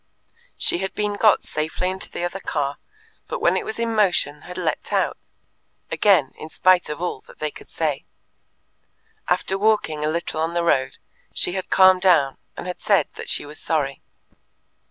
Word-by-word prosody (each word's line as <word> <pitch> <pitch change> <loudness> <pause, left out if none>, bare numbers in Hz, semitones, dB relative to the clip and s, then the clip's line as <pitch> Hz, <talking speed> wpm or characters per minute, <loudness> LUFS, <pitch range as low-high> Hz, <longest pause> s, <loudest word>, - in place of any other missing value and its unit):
She 170 - +1
had 190 0 -4
been 210 -1 -1
got 210 0 +4
safely 155 +4 -2
into 190 0 -6
the - - -5
other 175 +2 -3
car, 145 -5 -2 0.5
but - - -3
when 470 - +3
it - - 0
was 220 - -4
in 230 -1 -1
motion 180 -8 +1
had 180 - -7
leapt 170 -4 -2
out - - -1 0.6
again, 180 -10 +3
in 155 - -8
spite 185 +2 +3
of 150 - -4
all 175 -7 -3
that - - -15
they 155 -1 -3
could - - -13
say. 150 -4 -2 1.2
After 190 +1 +1
walking 205 -8 +1
a 155 - +1
little 160 -1 -2
on 165 +1 -1
the 170 - +1
road, 135 -6 +1 0.4
she - - +1
had 190 0 -4
calmed 185 -1 +6
down 160 -8 +3 0.2
and - - -6
had 180 0 -6
said - - +3
that - - -8
she - - 0
was 150 +1 -10
sorry. 145 -4 -1
175 Hz, 180 wpm, -23 LUFS, 150-190 Hz, 1.2 s, calmed